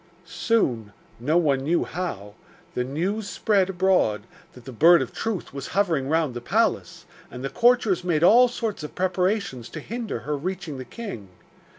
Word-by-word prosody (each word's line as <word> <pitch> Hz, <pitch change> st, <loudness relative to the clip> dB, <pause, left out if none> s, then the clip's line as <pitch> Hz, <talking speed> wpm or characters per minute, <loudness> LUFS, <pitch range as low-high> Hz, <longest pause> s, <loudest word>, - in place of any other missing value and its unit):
Soon 120 Hz, -, 0 dB, 0.3 s
no 150 Hz, +8 st, +1 dB
one 145 Hz, -6 st, +2 dB
knew 160 Hz, +6 st, +1 dB
how 130 Hz, -, -5 dB, 0.4 s
the 125 Hz, -, -1 dB
news 190 Hz, -, -2 dB
spread 200 Hz, -4 st, +1 dB
abroad 180 Hz, -, +2 dB, 0.3 s
that 125 Hz, -1 st, -15 dB
the 130 Hz, -, -7 dB
Bird 165 Hz, +8 st, +6 dB
of -, -, -4 dB
Truth 220 Hz, -10 st, -4 dB
was 140 Hz, -1 st, -6 dB
hovering 165 Hz, -9 st, +1 dB
round 160 Hz, -4 st, +1 dB
the 120 Hz, -, -6 dB
palace, -, -, 0 dB, 0.2 s
and 125 Hz, -, -8 dB
the 135 Hz, -, -3 dB
courtiers 235 Hz, -7 st, +3 dB
made 170 Hz, -3 st, +1 dB
all 240 Hz, +7 st, +7 dB
sorts 230 Hz, -5 st, -4 dB
of 150 Hz, -, -8 dB
preparations 185 Hz, -, -1 dB
to 155 Hz, -, -7 dB
hinder 225 Hz, -, -5 dB
her 150 Hz, +6 st, -2 dB
reaching 170 Hz, -2 st, -5 dB
the 130 Hz, -, -7 dB
king. 160 Hz, -, -8 dB
170 Hz, 170 wpm, -24 LUFS, 130-200 Hz, 0.4 s, all